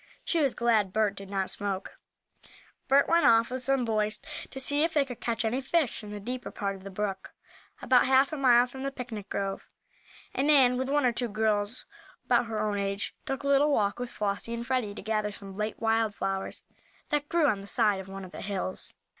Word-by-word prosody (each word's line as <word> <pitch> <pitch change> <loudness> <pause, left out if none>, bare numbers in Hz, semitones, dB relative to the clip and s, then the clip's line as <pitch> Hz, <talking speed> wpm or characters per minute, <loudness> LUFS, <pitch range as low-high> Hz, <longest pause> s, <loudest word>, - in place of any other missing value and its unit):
She 335 - +1
was 275 -4 +1
glad 220 -5 +2
Bert 215 0 +1
did 195 -1 -10
not 195 -1 -1
smoke. 200 -1 -4 0.9
Bert 280 +1 +4
went 335 0 +4
off 230 +1 +5
with 255 0 -2
some 270 -1 +2
boys 215 -1 0 0.3
to 265 - -7
see 285 +3 +3
if 325 0 0
they 290 -2 +4
could 250 -3 -8
catch 230 -1 -1
any 245 +4 0
fish 275 -4 0
in 210 - -8
the 210 0 -6
deeper 245 +5 -5
part 200 -2 -3
of 190 - -13
the 195 - -7
brook, 195 0 -4 0.5
about 255 0 +4
half 265 +3 +4
a - - -2
mile 245 -3 +5
from 265 +1 -9
the 275 0 -2
picnic 235 -6 -7
grove, 195 -1 -3 0.6
and 275 - 0
Nan, 265 -4 +5
with 260 +1 -2
one 290 -1 +2
or 245 - +4
two 245 +1 0
girls 215 +2 -1 0.4
about 235 - +2
her 220 -1 -3
own 210 -1 0
age, 200 0 -2
took 270 +1 -3
a - - -2
little 280 +2 +4
walk 205 -5 +1
with 245 -1 -4
Flossie 205 +2 -3
and 235 0 -5
Freddie 235 -5 -1
to - - -8
gather 215 -1 -1
some 195 -1 -9
late 210 +1 -3
wild 225 -1 +1
flowers 195 0 -3 0.5
that 295 -1 -1
grew 335 -2 +3
on 210 -8 +1
the 200 - -11
side 210 -3 +3
of 190 0 -9
one 195 0 -7
of 180 - -12
the - - -8
hills. 195 -2 -4
225 Hz, 220 wpm, -28 LUFS, 205-265 Hz, 0.9 s, off